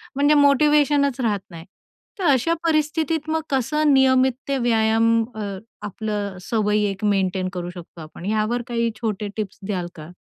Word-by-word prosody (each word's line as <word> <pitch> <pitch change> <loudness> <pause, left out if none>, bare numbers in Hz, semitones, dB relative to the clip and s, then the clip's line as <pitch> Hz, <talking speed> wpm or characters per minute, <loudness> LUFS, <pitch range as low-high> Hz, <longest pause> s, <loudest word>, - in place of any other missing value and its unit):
म्हणजे 290 +2 +4
मोटिवेशनच 285 -1 +3
राहत 210 -4 0
नाही. 165 -1 -10 0.5
तर 380 - -3
अशा 285 +2 +3
परिस्थितीत 315 -1 0
मग 320 0 0
कसं 290 +3 +1
नियमित 260 -1 +4
ते 275 - 0
व्यायाम 225 -2 +2 0.3
अ, 220 - -5 0.4
आपलं 210 0 -4
अ, - - -11
सवयी 210 0 0
एक 195 +1 -9
मेंटेन 190 -2 0
करू 175 -1 -4
शकतो 175 -1 -11
आपण? 155 +3 -10
यावर 215 +3 0
काही 235 -1 0
छोटे 210 -2 -2
टिप्स 210 -2 -5
द्याल 185 -4 -3
का? 155 0 -10
230 Hz, 160 wpm, -22 LUFS, 205-280 Hz, 0.5 s, म्हणजे